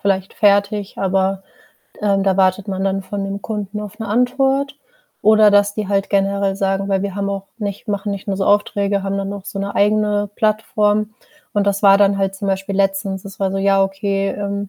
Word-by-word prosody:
vielleicht 195 -1 -1
fertig, 200 0 +1
aber, 195 0 0 0.6
ähm, 200 -2 +1
da 195 -1 +1
wartet 190 +1 +2
man 190 0 -2
dann 195 0 -1
von 200 +1 -4
dem 195 +1 -4
Kunden 210 -1 -4
auf 210 0 -9
'ne 220 - -5
Antwort. 270 +4 +1 0.5
Oder 215 0 +6
dass 205 0 +3
die 215 -1 -3
halt 195 -1 0
generell 195 0 +1
sagen 195 0 -1
weil 195 -1 +1
wir 200 -2 -3
haben 200 0 -2
auch 195 -1 -4
nicht 205 -1 -5
machen 205 0 -2
nicht 200 +1 -7
nur 195 - -1
so 195 - -1
Aufträge, 205 -1 +1
haben 195 0 -2
dann 195 0 -3
auch 200 -1 -8
so 200 - -6
'ne 200 +1 -3
eigene 205 0 +2
Plattform. 215 -1 0 0.4
Und 205 -2 0
das 200 0 0
war 195 -1 +7
dann 200 -1 +3
halt 195 0 0
zum 195 +1 -4
Beispiel 195 +1 -2
letztens, 195 -1 -1
es 195 - -10
war 190 -1 0
so: 195 - -1
„Ja, 195 0 +3
okay, 195 0 -1
ähm, 200 0 -4
200 Hz, 210 wpm, -19 LUFS, 195-205 Hz, 0.6 s, war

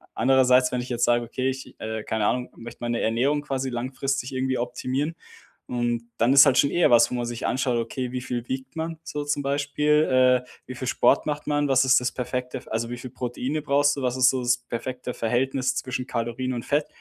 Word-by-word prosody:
andererseits, 130 0 +4
wenn 125 -1 -1
ich 125 - -8
jetzt 120 -1 +1
sage: 120 0 +2
„Okay, 130 +3 -2
ich, 130 0 -9
äh, 110 0 -4
keine 110 -1 -1
Ahnung, 125 +3 0
möchte 115 0 -10
meine 120 0 -1
Ernährung 135 +6 +1
quasi 135 -2 -2
langfristig 130 +2 -3
irgendwie 130 0 -1
optimieren." 130 +5 -2 0.5
Und 120 -1 -1
dann 120 +4 +3
ist 140 +1 +9
halt 130 -2 +3
schon 140 - +4
eher 175 - +3
was, 120 -1 +6
wo - - -3
man 120 -1 -2
sich 120 -1 -4
anschaut: 125 -1 0
Okay, 125 +2 -4
wie 125 - -3
viel 120 -1 -4
wiegt 130 +2 -5
man 160 0 -4
so 145 0 -4
zum 145 0 -1
Beispiel? 140 -2 +2
Äh, 125 - -21 0.2
wie 130 - -8
viel 130 0 -5
Sport 140 - +3
macht 150 0 -3
man? 145 -1 +1
Was 135 0 +4
ist 130 - +5
das 125 - -1
perfekte, 125 0 -4
f 130 - -12
also 115 +1 -2
wie 120 - -5
viel 125 0 -8
Proteine 130 +4 -3
brauchst 145 0 +2
du? 140 - -5
Was 125 0 -1
ist 130 0 +6
so 130 - -1
das 125 0 +3
perfekte 125 +1 -5
Verhältnis 130 +3 0
zwischen 130 0 -3
Kalorien 120 +2 -2
und 120 -1 -5
Fett? 145 +1 +1
130 Hz, 220 wpm, -25 LUFS, 120-135 Hz, 0.5 s, ist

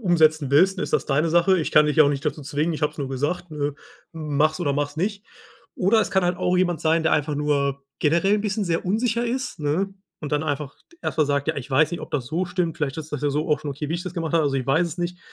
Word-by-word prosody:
umsetzen 160 - +3
willst, 185 +7 +4
dann - - -1
ist - - -4
das - - +1
deine 150 +3 +1
Sache. 175 +3 +4
Ich 155 - -2
kann 150 0 +5
dich 150 +1 +2
auch 145 - +7
nicht 140 -1 -2
dazu 150 - -2
zwingen. 150 +4 -1
Ich 155 - -5
habe 150 - +1
es - - -21
nur 135 -2 -3
gesagt, 145 +7 -2
ne, 145 -2 -2 0.4
mach's 155 +1 0
oder 145 -4 +1
mach's 145 +1 -2
nicht.“ 200 +4 -2 0.5
Oder 205 +5 +3
es 210 - -1
kann 190 -2 +2
halt 175 0 +1
auch 180 0 +1
jemand 175 -2 +1
sein, 160 +1 +2
der 160 - +2
einfach 150 0 +1
nur 140 -2 0 0.2
generell 170 +7 +3
'n 210 - 0
bisschen 210 0 -1
sehr 170 -1 -1
unsicher 230 +4 0
ist, 250 - -3
ne, 175 +7 0 0.3
und 150 -1 -6
dann 150 +1 +1
einfach 145 -2 -3 0.3
erstmal 155 -2 +1
sagt: 140 +1 0
„Ja, 160 - 0
ich 140 +1 -6
weiß 150 +4 +3
nicht, 175 - -4
ob - - -8
das 135 -5 -2
so 170 +8 -1
stimmt. 175 -2 -2
Vielleicht 145 -4 -2
ist 155 -1 -6
das 150 - -3
ja 145 - +1
so 150 +3 -1
auch 150 -1 +2
schon 150 -2 -4
okay, 145 +2 -5
wie 165 - -1
ich 175 - -3
das 180 -1 -7
gemacht 165 -3 -3
habe. 165 -2 +3
Also, 140 -2 0
ich 130 - -3
weiß 160 +6 +3
es 170 +2 -7
nicht.“ 175 +1 -3
155 Hz, 280 wpm, -23 LUFS, 145-180 Hz, 0.5 s, auch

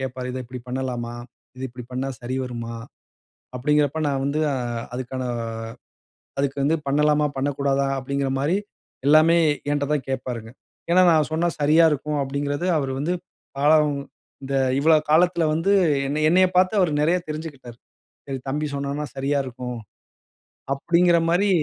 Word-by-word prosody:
கேட்பாரு, 130 -1 -4
"இத 130 - -4
இப்டி 125 +1 -8
பண்ணலாமா? 125 -2 -3 0.4
இத 130 - -8
இப்டி 125 0 -10
பண்ணா 130 +2 -2
சரி 125 +2 -4
வருமா?" 115 -2 -6 0.8
அப்டின்கிறப்ப 150 +3 +1
நான் 135 -1 -1
வந்து 150 +2 0
அ - - -2 0.4
அதுக்கான 130 +1 -4 1.2
அதுக்கு 140 0 0
வந்து 160 +3 +3
பண்ணலாமா? 150 +1 +3
பண்ணக்கூடாதா? 140 0 0
அப்டிங்குற 140 +1 -2
மாரி 160 +7 +1 0.5
எல்லாமே 155 +3 +6 0.4
என்ட்ட 145 -1 0
தான் 145 -3 -1
கேட்பாருங்க. 120 -3 -4 0.4
ஏன்னா 185 +1 +6
நான் 155 -2 +3
சொன்னா 170 +2 +1
சரியா 155 +3 +5
இருக்கும் 150 0 -2
அப்டிங்குறது, 140 +4 -2
அவர் 135 -2 -2
வந்து 160 +6 -1 0.5
காலம் 150 +1 +4 0.5
இந்த 135 0 -4 0.2
இவ்வள 160 +3 +5 0.2
காலத்துல 170 +1 +4
வந்து 165 +5 +1 0.3
என்னை 150 +2 -1
என்னைய 185 +3 +5
பார்த்து 185 +3 +4
அவர் 180 -4 +3
நெறைய 165 +4 +3
தெரிஞ்சுகிட்டாரு. 145 -6 -7 0.5
சரி 135 -1 -4
தம்பி 150 +3 -1
சொன்னான்னா 140 +1 -3
சரியா 140 +2 0
இருக்கும் 125 -1 -6 1.0
அப்டிங்கிற 170 +4 +3
மாரி 195 +4 +2
140 Hz, 140 wpm, -23 LUFS, 130-155 Hz, 1.2 s, எல்லாமே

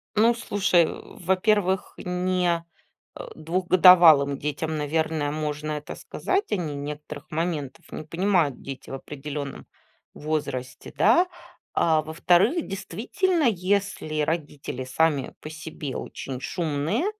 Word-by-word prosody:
Ну, 225 +3 +5
слушай, 195 -6 +2
во-первых, 190 +1 0
не, 180 -1 0 0.5
э, - - -7
двухгодовалым 170 -4 +6
детям, 150 +2 -3
наверное, 150 0 0
можно 150 0 -3
это 150 -1 -5
сказать. 395 +3 -2
Они 165 -7 -1
некоторых 150 +2 -7
моментов 155 -4 -3
не - - -6
понимают, 170 -3 +1
дети, 135 -1 -8
в - - -7
определенном 140 0 -6 0.5
возрасте, 140 -5 -4
да. 355 +2 +5 0.5
А, 160 -2 +3
во-вторых, 175 - +2
действительно, 275 - -1
если 195 -6 0
родители 150 -4 -3
сами 140 +1 +1
по 155 - -8
себе 155 -3 -7
очень 130 -2 -6
шумные, 155 - -1
160 Hz, 110 wpm, -25 LUFS, 150-185 Hz, 0.5 s, двухгодовалым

